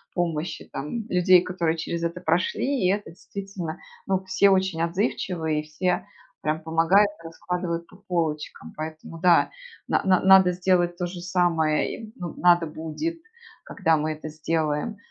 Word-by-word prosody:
помощи 170 Hz, -2 st, -2 dB
там 150 Hz, -, -4 dB
людей, 180 Hz, 0 st, +5 dB
которые 170 Hz, -3 st, -1 dB
через 165 Hz, +1 st, -3 dB
это 170 Hz, +1 st, -2 dB
прошли. 185 Hz, -, 0 dB
И -, -, +4 dB
это 205 Hz, -2 st, -3 dB
действительно, 190 Hz, -2 st, -7 dB, 0.3 s
ну, 190 Hz, -1 st, 0 dB
все 190 Hz, +1 st, +4 dB
очень 190 Hz, -3 st, +2 dB
отзывчивые, 170 Hz, -3 st, -1 dB
и -, -, -12 dB
все 180 Hz, +4 st, -1 dB, 0.3 s
прям 155 Hz, +1 st, -1 dB
помогают, 165 Hz, +6 st, +4 dB
раскладывают 170 Hz, 0 st, -4 dB
по -, -, -18 dB
полочкам. 170 Hz, -6 st, -3 dB
Поэтому, 155 Hz, +1 st, -7 dB
да, 175 Hz, -1 st, +4 dB, 0.4 s
на -, -, +2 dB
на 185 Hz, -2 st, +4 dB
надо 190 Hz, -1 st, +7 dB
сделать 175 Hz, -1 st, +1 dB
то 180 Hz, -, -1 dB
же 175 Hz, 0 st, -6 dB
самое 175 Hz, -4 st, +1 dB
и, 220 Hz, -1 st, -10 dB
ну, 175 Hz, -3 st, -6 dB
надо 175 Hz, -1 st, +5 dB
будет, 165 Hz, -, -4 dB, 0.5 s
когда 160 Hz, -1 st, +1 dB
мы 155 Hz, +1 st, -1 dB
это 155 Hz, 0 st, -8 dB
сделаем, 155 Hz, +5 st, -1 dB
175 Hz, 150 wpm, -25 LUFS, 160-185 Hz, 0.5 s, надо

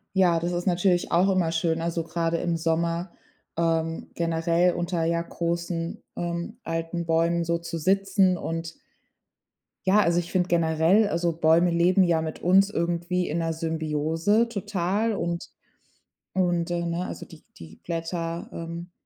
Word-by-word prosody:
Ja, 175 Hz, -3 st, +4 dB
das 175 Hz, +1 st, -2 dB
ist 175 Hz, +1 st, -3 dB
natürlich 180 Hz, 0 st, +1 dB
auch 180 Hz, +3 st, +4 dB
immer 185 Hz, -4 st, +1 dB
schön, 165 Hz, 0 st, 0 dB
also 170 Hz, 0 st, -1 dB
gerade 165 Hz, 0 st, -1 dB
im 170 Hz, -1 st, -1 dB
Sommer, 170 Hz, +2 st, -1 dB, 0.4 s
ähm, 165 Hz, 0 st, -1 dB
generell 170 Hz, +1 st, +1 dB
unter, 175 Hz, -1 st, -1 dB
ja, 170 Hz, 0 st, +1 dB
großen, 170 Hz, 0 st, -3 dB
ähm, 175 Hz, +6 st, -4 dB
alten 165 Hz, +1 st, -3 dB
Bäumen 170 Hz, +1 st, +2 dB
so 170 Hz, 0 st, 0 dB
zu 170 Hz, 0 st, -5 dB
sitzen. 190 Hz, +1 st, +2 dB
Und 165 Hz, 0 st, -4 dB, 1.1 s
ja, 195 Hz, +3 st, +5 dB
also 170 Hz, -3 st, +2 dB
ich 175 Hz, 0 st, -3 dB
finde 180 Hz, -1 st, +1 dB
generell, 170 Hz, +5 st, +3 dB
also, 170 Hz, -3 st, 0 dB
Bäume 165 Hz, +2 st, +3 dB
leben 175 Hz, +3 st, +4 dB
ja 170 Hz, -3 st, +3 dB
mit 160 Hz, -1 st, -5 dB
uns 190 Hz, +3 st, +5 dB
irgendwie 175 Hz, 0 st, -1 dB
in 160 Hz, -, -2 dB
'ner 165 Hz, -1 st, -1 dB
Symbiose 160 Hz, +6 st, 0 dB
total 205 Hz, 0 st, -1 dB
und 170 Hz, -3 st, -3 dB, 0.8 s
und, 175 Hz, -2 st, +1 dB
äh, 170 Hz, 0 st, -1 dB
ne, 170 Hz, +2 st, -2 dB
also, -, -, -7 dB
die 165 Hz, -, -15 dB
die 80 Hz, -1 st, -12 dB
Blätter, 165 Hz, 0 st, -3 dB
ähm, 170 Hz, +1 st, -7 dB
170 Hz, 150 wpm, -26 LUFS, 165-180 Hz, 1.1 s, ja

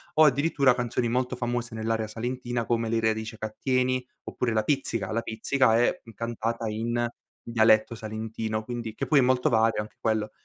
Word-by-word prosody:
o 155 Hz, -, +7 dB
addirittura 140 Hz, -2 st, +3 dB
canzoni 120 Hz, -1 st, -1 dB
molto 125 Hz, +1 st, 0 dB
famose 120 Hz, -1 st, -3 dB
nell'area 110 Hz, 0 st, -1 dB
salentina 120 Hz, +1 st, -3 dB
come 115 Hz, -1 st, 0 dB
Le 115 Hz, 0 st, +1 dB
radici 110 Hz, 0 st, -1 dB
ca 110 Hz, 0 st, -4 dB
tieni 130 Hz, -1 st, +1 dB, 0.2 s
oppure 120 Hz, -2 st, -2 dB
la 110 Hz, -1 st, +2 dB
pizzica. 115 Hz, -7 st, -1 dB
La 115 Hz, +1 st, 0 dB
pizzica 115 Hz, +1 st, +2 dB
è, 120 Hz, -, +2 dB
mhmm, 115 Hz, -, -13 dB
cantata 115 Hz, -1 st, -3 dB
in 120 Hz, +2 st, -1 dB, 0.4 s
dialetto 110 Hz, -1 st, +3 dB
salentino, 110 Hz, 0 st, -4 dB
quindi 120 Hz, -2 st, -5 dB
che -, -, -2 dB
poi 150 Hz, -3 st, +5 dB
è -, -, +6 dB
molto 125 Hz, 0 st, +3 dB
vario 110 Hz, -1 st, +3 dB
anche 105 Hz, -, -11 dB
quello. 110 Hz, -1 st, 0 dB
115 Hz, 180 wpm, -27 LUFS, 110-125 Hz, 0.4 s, o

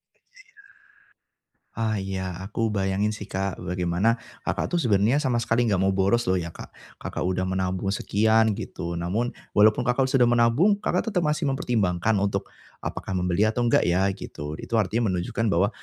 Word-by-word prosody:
Iya. -, -, -38 dB, 1.5 s
Ah 110 Hz, -1 st, -1 dB
ya. 95 Hz, -2 st, -4 dB
Aku 110 Hz, +3 st, -1 dB
bayangin 100 Hz, +1 st, 0 dB
sih 105 Hz, -, -7 dB
Kak, 95 Hz, -1 st, -3 dB
bagaimana 90 Hz, +6 st, 0 dB, 0.2 s
Kakak -, -, -1 dB
tuh -, -, +2 dB
sebenarnya 110 Hz, +1 st, +3 dB
sama 125 Hz, -4 st, +1 dB
sekali 115 Hz, +1 st, +1 dB
enggak 100 Hz, -5 st, +1 dB
mau 95 Hz, -, +2 dB
boros 100 Hz, +4 st, +1 dB
loh 95 Hz, -, +3 dB
ya, 85 Hz, -2 st, -4 dB
Kak. -, -, -10 dB, 0.3 s
Kakak -, -, -4 dB
udah 95 Hz, 0 st, 0 dB
menabung 95 Hz, +1 st, -1 dB
sekian 110 Hz, +2 st, +2 dB
gitu. 85 Hz, -3 st, -5 dB
Namun 90 Hz, +8 st, -2 dB, 0.2 s
walaupun 105 Hz, +1 st, +5 dB
Kakak 125 Hz, +2 st, +2 dB
sudah 130 Hz, -2 st, +3 dB
menabung, 120 Hz, -, +4 dB
Kakak 180 Hz, +5 st, 0 dB
tetep 180 Hz, -6 st, 0 dB
masih 150 Hz, 0 st, 0 dB
mempertimbangkan 110 Hz, -7 st, 0 dB
untuk 100 Hz, 0 st, -1 dB, 0.4 s
apakah 95 Hz, -, -4 dB
membeli 90 Hz, +3 st, +1 dB
atau 120 Hz, +2 st, -1 dB
enggak 115 Hz, -, +3 dB
ya 90 Hz, +2 st, +2 dB
gitu. 75 Hz, -5 st, -7 dB
Itu 115 Hz, -, -2 dB
artinya 110 Hz, +1 st, +1 dB
menunjukkan 95 Hz, +5 st, -1 dB
bahwa 95 Hz, +2 st, +3 dB
105 Hz, 165 wpm, -25 LUFS, 95-115 Hz, 1.5 s, walaupun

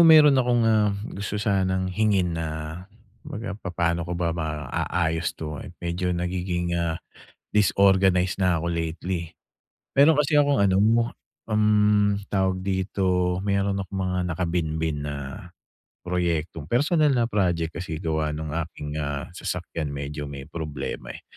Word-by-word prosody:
meron 155 Hz, -3 st, +8 dB
akong, 125 Hz, -3 st, +3 dB
ah, 110 Hz, -2 st, +4 dB, 0.2 s
gusto 100 Hz, +1 st, -4 dB
sanang 95 Hz, -3 st, 0 dB
hingin 100 Hz, -4 st, +2 dB
na 80 Hz, -1 st, -2 dB, 0.7 s
'baga 115 Hz, -9 st, -6 dB
papaano 85 Hz, -4 st, -1 dB
ko 85 Hz, +1 st, -3 dB
ba 85 Hz, -1 st, 0 dB
maaayos 80 Hz, +1 st, -1 dB
'to, 75 Hz, -2 st, -5 dB
eh. -, -, -8 dB
Medyo 90 Hz, +1 st, -2 dB
nagiging, 90 Hz, 0 st, -2 dB
ah, 85 Hz, -1 st, 0 dB, 0.5 s
disorganize 95 Hz, -3 st, +3 dB
na 90 Hz, -4 st, +2 dB
ako 85 Hz, -, -1 dB
lately. 85 Hz, +1 st, -3 dB, 0.6 s
Meron 145 Hz, +2 st, +6 dB
kasi 150 Hz, +1 st, +2 dB
akong 145 Hz, -1 st, +4 dB
ano 100 Hz, -1 st, +4 dB
mo 115 Hz, +2 st, +3 dB, 0.3 s
um, 105 Hz, -1 st, +3 dB
tawag 95 Hz, -2 st, +1 dB
dito, 95 Hz, -2 st, +1 dB
meron 100 Hz, 0 st, +1 dB
akong 95 Hz, 0 st, -6 dB
mga 90 Hz, 0 st, -1 dB
nakabinbin 80 Hz, -3 st, -1 dB
na 70 Hz, -, -3 dB, 0.9 s
proyekto. 85 Hz, -3 st, -1 dB
Personal 145 Hz, -, +3 dB
na 120 Hz, -2 st, +1 dB
project 85 Hz, -6 st, 0 dB
kasi 80 Hz, -2 st, -5 dB
gawa 80 Hz, -2 st, 0 dB
nung 80 Hz, +1 st, -4 dB
aking, 75 Hz, -1 st, -4 dB
ah, 75 Hz, -2 st, -3 dB
sasakyan 85 Hz, -6 st, -4 dB
medyo 70 Hz, +1 st, -4 dB
may 70 Hz, 0 st, -8 dB
problema, 75 Hz, -2 st, -5 dB
eh. -, -, -10 dB
90 Hz, 135 wpm, -25 LUFS, 80-105 Hz, 0.9 s, meron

